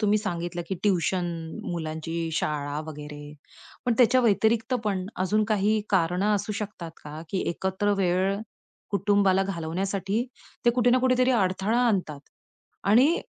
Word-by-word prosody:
तुम्ही 210 Hz, -1 st, +3 dB
सांगितलं 175 Hz, -3 st, -3 dB
की 190 Hz, -, -1 dB
ट्युशन, 185 Hz, -2 st, +1 dB, 0.5 s
मुलांची 165 Hz, 0 st, -3 dB
शाळा 145 Hz, -2 st, -2 dB
वगैरे. 150 Hz, -1 st, -8 dB, 0.5 s
पण 245 Hz, -, +2 dB
त्याच्या 255 Hz, +1 st, +5 dB
व्यतिरिक्त 225 Hz, +2 st, +2 dB
पण 190 Hz, -3 st, -1 dB
अजून 210 Hz, +4 st, +1 dB
काही 215 Hz, 0 st, +2 dB
कारणं 190 Hz, +3 st, +2 dB
असू 205 Hz, +1 st, -2 dB
शकतात 200 Hz, -5 st, -5 dB
का, 150 Hz, +1 st, -7 dB
की 190 Hz, -, -1 dB
एकत्र 190 Hz, +4 st, -1 dB
वेळ 190 Hz, +2 st, +2 dB, 0.5 s
कुटुंबाला 200 Hz, -1 st, +3 dB
घालवण्यासाठी 195 Hz, +4 st, -2 dB, 0.4 s
ते 240 Hz, -, +6 dB
कुठे 245 Hz, 0 st, +2 dB
ना 255 Hz, -, +5 dB
कुठेतरी 255 Hz, 0 st, +3 dB
अडथळा 200 Hz, +1 st, +1 dB
आणतात 180 Hz, -10 st, 0 dB, 0.7 s
आणि 255 Hz, +11 st, +5 dB
195 Hz, 130 wpm, -26 LUFS, 170-215 Hz, 0.7 s, ते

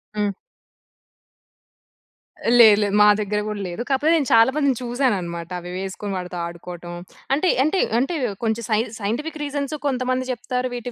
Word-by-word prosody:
హ్మ్. 205 Hz, -1 st, 0 dB, 2.3 s
లేదు 215 Hz, -3 st, +9 dB
లేదు, 205 Hz, 0 st, 0 dB
మా -, -, +8 dB, 0.2 s
దగ్గర 210 Hz, 0 st, -1 dB
కూడా 210 Hz, -1 st, -4 dB
లేదు. 175 Hz, +7 st, -5 dB
కాకపోతే 285 Hz, +4 st, +2 dB
నేను 290 Hz, -5 st, +1 dB
చాలా 230 Hz, +2 st, +7 dB
మందిని 280 Hz, -5 st, +2 dB
చూసాను 245 Hz, -1 st, +1 dB
అన్నమాట. 170 Hz, -1 st, -6 dB
అవి 175 Hz, +1 st, -8 dB
వేసుకొని 195 Hz, +1 st, -5 dB
వాడితో 180 Hz, 0 st, -6 dB
ఆడుకోవటం, 175 Hz, 0 st, -9 dB, 0.4 s
అంటే 320 Hz, +6 st, +2 dB
అంటే 340 Hz, +6 st, +1 dB, 0.2 s
అంటే‌వ్ 275 Hz, 0 st, -1 dB, 0.2 s
కొంచెం 225 Hz, +1 st, 0 dB
సైన్ 220 Hz, +2 st, +1 dB
సైంటిఫిక్ 275 Hz, +10 st, -3 dB
రీజన్స్ 285 Hz, 0 st, -3 dB
కొంతమంది 255 Hz, 0 st, -1 dB
చెప్తారు 250 Hz, +1 st, -2 dB
వీటి 245 Hz, 0 st, -5 dB
235 Hz, 150 wpm, -22 LUFS, 200-265 Hz, 2.3 s, లేదు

